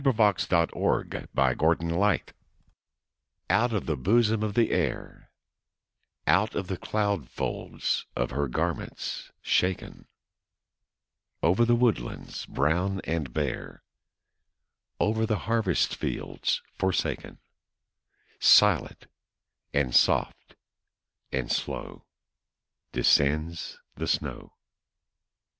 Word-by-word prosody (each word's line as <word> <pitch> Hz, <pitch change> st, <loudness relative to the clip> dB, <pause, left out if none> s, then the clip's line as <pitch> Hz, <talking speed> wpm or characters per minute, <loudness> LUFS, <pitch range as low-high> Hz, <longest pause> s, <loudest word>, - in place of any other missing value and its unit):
Henry 135 Hz, -2 st, +4 dB
Wadsworth 95 Hz, -6 st, +2 dB
Longfellow 70 Hz, +5 st, +1 dB
Snow 85 Hz, +2 st, -2 dB
Flakes 105 Hz, -4 st, +1 dB, 1.2 s
OUT 120 Hz, +2 st, +3 dB
of 105 Hz, -5 st, -1 dB
the 80 Hz, -, 0 dB
bosom 110 Hz, -, +2 dB
of 105 Hz, -1 st, -2 dB
the 115 Hz, -2 st, +3 dB
Air 80 Hz, -8 st, -2 dB, 1.0 s
Out 95 Hz, +8 st, +3 dB
of 95 Hz, -, -2 dB
the 95 Hz, -, -2 dB
cloud 100 Hz, -, -1 dB
folds -, -, -3 dB
of -, -, -1 dB
her 70 Hz, +2 st, -1 dB
garments -, -, -3 dB
shaken, 90 Hz, 0 st, -1 dB, 1.4 s
Over 95 Hz, +8 st, +4 dB
the 120 Hz, 0 st, +4 dB
woodlands 115 Hz, -, -1 dB
brown 90 Hz, +7 st, 0 dB
and 80 Hz, -5 st, -2 dB
bare, 70 Hz, 0 st, -4 dB, 1.2 s
Over 110 Hz, +1 st, +1 dB
the 110 Hz, -2 st, +1 dB
harvest 110 Hz, -5 st, +1 dB
fields -, -, -2 dB, 0.2 s
forsaken, 95 Hz, -1 st, -1 dB, 1.0 s
Silent, -, -, +5 dB, 0.7 s
and 70 Hz, -4 st, 0 dB
soft, -, -, +2 dB, 0.8 s
and 65 Hz, -2 st, -2 dB
slow -, -, -4 dB, 0.8 s
Descends 75 Hz, +4 st, +1 dB, 0.2 s
the -, -, -4 dB
snow. -, -, -3 dB
90 Hz, 95 wpm, -27 LUFS, 75-105 Hz, 1.4 s, Silent